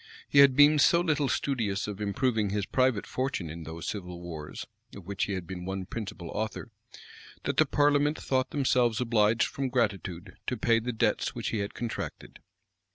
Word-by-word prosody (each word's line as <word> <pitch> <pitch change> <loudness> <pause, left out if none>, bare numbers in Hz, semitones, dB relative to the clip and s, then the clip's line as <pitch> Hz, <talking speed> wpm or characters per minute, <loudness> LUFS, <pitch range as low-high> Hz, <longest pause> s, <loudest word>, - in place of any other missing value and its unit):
He 140 - +4
had 140 -2 +7
been 145 +2 +7
so 170 +4 +5
little 150 -5 +1
studious 110 -8 -1
of 105 0 -6
improving 105 +1 0
his 100 0 -1
private 130 -4 +1
fortune 130 - -3
in 80 0 -8
those 80 +1 -7
civil 90 -4 -5
wars, 80 -3 -7 0.3
of 100 - -10
which 100 0 -2
he 100 - -3
had 95 -2 -4
been 90 +1 -7
one 95 0 -4
principal 95 -5 -6
author, 110 +1 -4 0.7
that - - -2
the - - +5
parliament 145 +1 +3
thought 130 -1 0
themselves 125 -5 +2
obliged 115 -2 +3
from 135 -1 -3
gratitude 100 -8 -2
to 125 - -1
pay 115 +1 +3
the 120 +2 -3
debts 115 - 0
which - - -3
he 110 - -2
had 100 0 -4
contracted. 120 -2 -6
110 Hz, 180 wpm, -28 LUFS, 95-130 Hz, 0.7 s, had